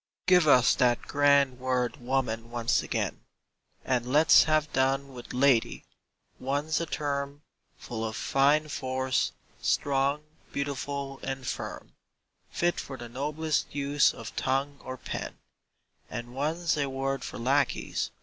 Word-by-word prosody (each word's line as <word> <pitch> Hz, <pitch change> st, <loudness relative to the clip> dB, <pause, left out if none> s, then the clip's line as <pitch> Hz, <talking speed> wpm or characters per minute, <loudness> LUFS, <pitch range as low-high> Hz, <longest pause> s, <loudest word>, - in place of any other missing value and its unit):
Give 180 Hz, -3 st, +5 dB
us 125 Hz, -4 st, +6 dB
that 120 Hz, -2 st, +2 dB
grand 140 Hz, -3 st, +3 dB
word 125 Hz, -2 st, -1 dB
"woman" 120 Hz, -3 st, -2 dB
once 120 Hz, -1 st, +1 dB
again, -, -, -3 dB, 0.6 s
And 125 Hz, -2 st, +1 dB
let's 150 Hz, +5 st, +6 dB
have 155 Hz, -1 st, +1 dB
done 135 Hz, +1 st, +1 dB
with 120 Hz, -1 st, -9 dB
"lady": 130 Hz, -3 st, +2 dB, 0.5 s
one's 145 Hz, +5 st, -1 dB
a 170 Hz, -, -3 dB
term 140 Hz, -1 st, -3 dB, 0.3 s
Full 115 Hz, -3 st, -5 dB
of 110 Hz, -1 st, -3 dB
fine 145 Hz, +3 st, +2 dB
force, 130 Hz, -2 st, -1 dB, 0.3 s
strong, 140 Hz, +1 st, +1 dB, 0.3 s
beautiful, 140 Hz, 0 st, -4 dB
and 135 Hz, -1 st, -4 dB
firm, -, -, -5 dB, 0.6 s
Fit 175 Hz, 0 st, 0 dB
for 135 Hz, -, -6 dB
the 120 Hz, -1 st, -8 dB
noblest 150 Hz, +5 st, -2 dB
use 140 Hz, 0 st, +3 dB
of -, -, -9 dB
tongue 135 Hz, +2 st, -1 dB
or 130 Hz, 0 st, -6 dB
pen; -, -, -6 dB, 0.7 s
And 120 Hz, +1 st, -6 dB
one's 155 Hz, +4 st, 0 dB
a 140 Hz, -1 st, 0 dB
word 135 Hz, +1 st, -2 dB
for -, -, -6 dB
lackeys. 135 Hz, +3 st, 0 dB
135 Hz, 130 wpm, -28 LUFS, 130-145 Hz, 0.7 s, us